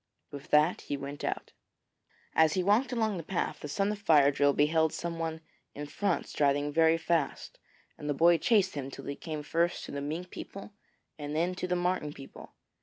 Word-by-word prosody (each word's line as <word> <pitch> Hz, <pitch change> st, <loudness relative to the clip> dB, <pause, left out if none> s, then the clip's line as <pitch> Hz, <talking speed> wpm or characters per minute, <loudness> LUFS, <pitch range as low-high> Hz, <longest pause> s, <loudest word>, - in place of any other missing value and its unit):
With 140 Hz, -1 st, -9 dB
that 150 Hz, +4 st, +3 dB
he 145 Hz, -, -4 dB
went 140 Hz, +1 st, -7 dB
out. -, -, -3 dB, 0.8 s
As 160 Hz, -1 st, +4 dB
he 185 Hz, -, +1 dB
walked 215 Hz, +7 st, +3 dB
along 220 Hz, -5 st, 0 dB
the 165 Hz, -, -5 dB
path, 175 Hz, +2 st, -2 dB
the -, -, -6 dB
son 195 Hz, +8 st, 0 dB
of 210 Hz, -, -5 dB
Fire 150 Hz, -8 st, +5 dB
drill 145 Hz, 0 st, +3 dB
beheld 160 Hz, +2 st, +2 dB
someone 165 Hz, -1 st, -4 dB, 0.3 s
in 145 Hz, -, -5 dB
front 185 Hz, +5 st, -1 dB
striding 145 Hz, 0 st, +1 dB
very 160 Hz, +1 st, +4 dB
fast; 165 Hz, 0 st, -2 dB, 0.4 s
and 150 Hz, -, -5 dB
the 145 Hz, -, 0 dB
boy 170 Hz, +3 st, +5 dB
chased 200 Hz, -1 st, +3 dB
him 135 Hz, -2 st, -4 dB
till -, -, -9 dB
he 140 Hz, -, -4 dB
came 155 Hz, -1 st, -6 dB
first 170 Hz, +4 st, 0 dB
to -, -, -8 dB
the 140 Hz, -, -4 dB
Mink 160 Hz, +5 st, -4 dB
people 200 Hz, +1 st, -9 dB, 0.5 s
and 145 Hz, 0 st, -4 dB
then 175 Hz, +3 st, +1 dB
to 180 Hz, 0 st, -4 dB
the 180 Hz, -, 0 dB
Marten 175 Hz, -4 st, -1 dB
people. 135 Hz, -1 st, -12 dB
160 Hz, 195 wpm, -30 LUFS, 145-180 Hz, 0.8 s, Fire